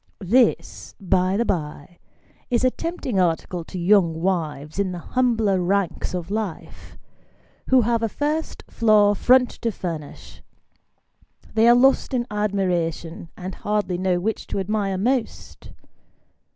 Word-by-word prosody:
This, 235 +5 +1
by 185 0 +1
the 235 - +1
bye, 155 -2 -4 0.5
is 240 -1 +1
a 255 - +4
tempting 330 - -3
article 175 0 -1
to 185 - -8
young 175 -3 +3
wives 160 -3 -2
in 195 -2 0
the - - -5 0.2
humbler 225 -7 +2
ranks 185 -1 -1
of 180 +1 -5
life, 210 -5 -6 0.7
who 260 -1 +5
have 230 0 0
a 225 - 0
first 300 +6 -3
floor 210 -3 +4
front 250 +4 +4
to 230 - 0
furnish 165 -7 -7 1.1
they 225 +1 +4
are 240 - +7
lost 265 +1 +3
in 240 -1 0
admiration, 180 -5 -2
and 185 +1 -6
hardly 205 -4 -2
know 185 -1 +1
which 215 +5 -3
to - - -4
admire 195 -1 -1
most. 240 +4 -3
200 Hz, 135 wpm, -22 LUFS, 180-230 Hz, 1.1 s, are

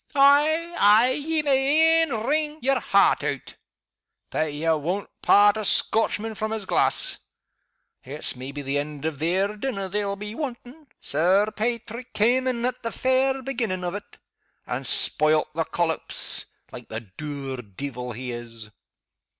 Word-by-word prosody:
"Ay! 300 +5 +4
ay! 215 +5 +6
ye 305 +3 -1
may 300 +4 +4
e'en 250 -9 -1
ring 300 +1 0
yer 270 +1 +2
heart - - +3
out - - -4 0.8
but 155 -1 -1
ye 150 +3 -4
won't 165 +5 0
part 205 +1 +5
a 215 - -3
Scotchman 220 +2 +2
from 215 +1 -3
his 220 -2 -3
glass. - - +1 0.8
It's 140 +2 -4
maybe 140 +3 -7
the 140 +1 -1
end 145 0 -6
of 155 -3 -3
their 190 +6 0
dinner 210 -4 -3
they'll 200 0 -1
be 210 +1 -7
wantin'. 270 +2 -7
Sir 185 +8 +2
Paitrick 235 +2 -3
cam' 250 +4 +3
in 240 -2 -1
at 250 0 -2
the 230 - -3
fair 260 +2 +1
beginning 230 -8 -3
of 175 0 -3
it, 205 0 -9 0.5
and - - -4
spoilt 155 0 +3
the 165 +1 -1
collops, 165 -1 -3 0.2
like - - -10
the 110 +1 -5
dour 135 +5 -6
deevil 125 +3 -6
he 125 +2 -6
is!" 115 -2 -9
205 Hz, 150 wpm, -24 LUFS, -, 0.8 s, ay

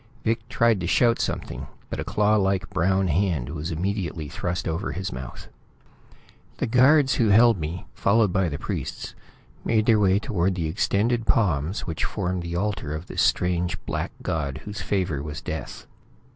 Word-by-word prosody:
Vic 115 +1 -1
tried 115 -4 +3
to 85 - -3
shout 115 +5 +3
something, 65 +2 -3 0.2
but - - -3
a - - -1
claw 105 +1 +2
like 95 0 +1
brown 95 +3 +2
hand 85 -7 0
was 80 +1 -4
immediately 85 -2 -2
thrust 90 +5 -3
over 80 +5 -2
his 95 +1 -4
mouth. 65 0 -8 1.1
The - - 0
guards 130 +4 +5
who 115 - +4
held 110 0 +6
me, 80 +3 -4
followed 105 -2 +2
by 95 -3 +2
the 70 - -4
priests, - - -5 0.5
made 110 -2 +2
their 115 -2 +5
way 95 -2 +4
toward 95 -2 0
the 85 -3 -2
extended 110 +7 0
palms 90 -3 +1
which 80 -3 -4
formed 90 0 -2
the 85 0 -5
altar 95 -6 -2
of 80 +3 -6
this - - -2
strange 90 0 +1
black - - -3
god 70 -5 -2
whose 105 0 -6
favor 90 -8 -1
was 75 0 -5
death. - - -6
95 Hz, 170 wpm, -25 LUFS, 80-105 Hz, 1.1 s, held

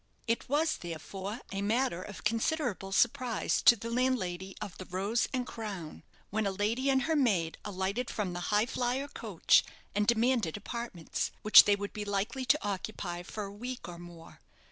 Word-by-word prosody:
It 230 +1 -1
was 315 +3 +2
therefore 190 +6 -6
a 195 - -2
matter 220 -2 +1
of 205 +2 -9
considerable 225 - 0
surprise 240 +3 +1
to 240 - +8
the 230 +1 -6
landlady 195 -7 -1
of 185 - -6
the 185 - -6
"Rose 195 +6 0
and 255 -2 -1
Crown," 200 -10 -6 0.3
when 215 0 0
a - - 0
lady 220 +7 0
and 265 -1 +3
her 320 - +1
maid 195 - +1
alighted 200 +4 -2
from 195 -4 -2
the 175 - -4
"Highflyer" 245 +5 0
coach - - +3 0.3
and 210 0 +1
demanded 235 -6 +2
apartments, 210 -5 -4
which 215 - +10
they 205 - +4
would 200 0 -5
be 210 - -4
likely 205 +6 -2
to 295 -5 +2
occupy 190 -3 -4
for 210 +4 -6
a 200 0 -7
week 245 +3 -6
or 175 -1 -8
more. 175 -1 -12
210 Hz, 170 wpm, -31 LUFS, 190-245 Hz, 0.3 s, which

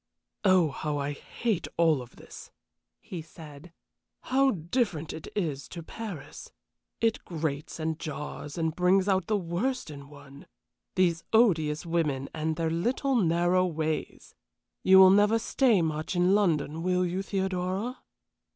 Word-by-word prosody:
"Oh, 185 -5 +4
how 150 +1 -3
I 140 0 -2
hate 210 +7 -3
all 160 -6 +3
this!" - - -13 0.5
he 175 -3 -7
said. 155 0 -13 0.5
"How 270 +1 +2
different 175 - -1
it 160 - -8
is 150 -9 -2
to 170 - -8
Paris! 175 -7 -8 0.5
It 225 -1 +1
grates 155 -3 -4
and 160 0 -2
jars 150 -1 -6
and 160 -1 -1
brings 185 +2 +3
out 190 -3 +1
the 215 - +2
worst 190 +4 -2
in 140 -1 -10
one. 140 -1 -14 0.5
These 170 -3 +2
odious 160 -9 +3
women 150 -5 -1
and 160 0 -2
their 165 0 -1
little, 245 - 0
narrow 175 -2 +2
ways! 160 -2 -4 0.5
You 190 0 +6
will 190 0 +9
never 205 +3 +4
stay 225 -4 +2
much 155 +2 -2
in 180 +2 +3
London 165 -6 +1
will 180 +1 +1
you, 180 +2 -2
Theodora?" 190 +4 -2
170 Hz, 140 wpm, -28 LUFS, 155-195 Hz, 0.5 s, will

